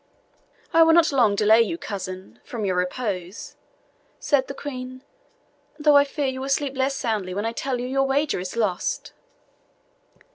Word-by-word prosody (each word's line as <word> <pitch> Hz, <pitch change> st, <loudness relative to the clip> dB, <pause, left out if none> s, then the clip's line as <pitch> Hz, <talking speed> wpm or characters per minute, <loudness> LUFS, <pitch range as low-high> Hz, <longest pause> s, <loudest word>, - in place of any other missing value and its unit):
"I 330 Hz, -, +6 dB
will 325 Hz, 0 st, +6 dB
not 330 Hz, -1 st, +5 dB
long 235 Hz, -7 st, +3 dB
delay 215 Hz, +2 st, +5 dB
you, 335 Hz, +9 st, -1 dB
cousin, 185 Hz, -, -7 dB
from 225 Hz, -4 st, -5 dB
your 185 Hz, -2 st, 0 dB
repose," 180 Hz, 0 st, -3 dB, 0.6 s
said 270 Hz, -3 st, +1 dB
the 275 Hz, -, -6 dB
Queen, 255 Hz, -2 st, -7 dB, 0.7 s
"though 295 Hz, -1 st, +4 dB
I 285 Hz, 0 st, +7 dB
fear 285 Hz, 0 st, -3 dB
you 260 Hz, -1 st, -2 dB
will 270 Hz, -, -4 dB
sleep 275 Hz, 0 st, 0 dB
less 265 Hz, +1 st, 0 dB
soundly 210 Hz, -8 st, -2 dB
when 205 Hz, +2 st, -2 dB
I 225 Hz, -, -1 dB
tell 250 Hz, +2 st, -3 dB
you 245 Hz, -, -3 dB
your 270 Hz, +1 st, +1 dB
wager 285 Hz, -2 st, 0 dB
is 180 Hz, +3 st, -6 dB
lost." 210 Hz, -6 st, -2 dB
255 Hz, 170 wpm, -24 LUFS, 205-275 Hz, 0.7 s, I